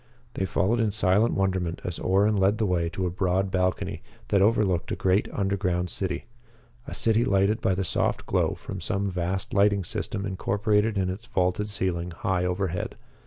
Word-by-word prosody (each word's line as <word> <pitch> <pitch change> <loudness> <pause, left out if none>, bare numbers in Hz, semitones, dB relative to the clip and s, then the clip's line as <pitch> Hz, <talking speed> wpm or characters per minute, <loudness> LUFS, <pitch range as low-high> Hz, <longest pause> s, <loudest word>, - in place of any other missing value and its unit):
They 95 - -1
followed 105 +5 +1
in 110 -2 +2
silent 105 +2 +2
wonderment 95 -3 0
as 90 - -3
Orrin 100 +3 +2
led 100 +2 +3
the 110 - +1
way 85 -3 +1
to 95 +2 -3
a 90 - -1
broad 95 +1 0
balcony 90 -1 -1 0.3
that 100 - +3
overlooked 100 -4 +2
a - - 0
great 95 +2 +1
underground 95 -3 -1
city 90 -3 -3 0.6
a - - -5
city 115 +1 +2
lighted 100 +2 +2
by 95 - +2
the 95 0 -1
soft - - 0
glow - - +1
from - - -7
some 100 0 -1
vast 90 +1 -3
lighting 100 0 +3
system 100 +3 -3
incorporated 105 +2 +1
in 95 -1 +1
its 110 +6 -8
vaulted 100 -2 0
ceiling 90 -4 -1
high 90 +1 -1
overhead. 90 -1 -2
95 Hz, 175 wpm, -26 LUFS, 90-105 Hz, 0.6 s, led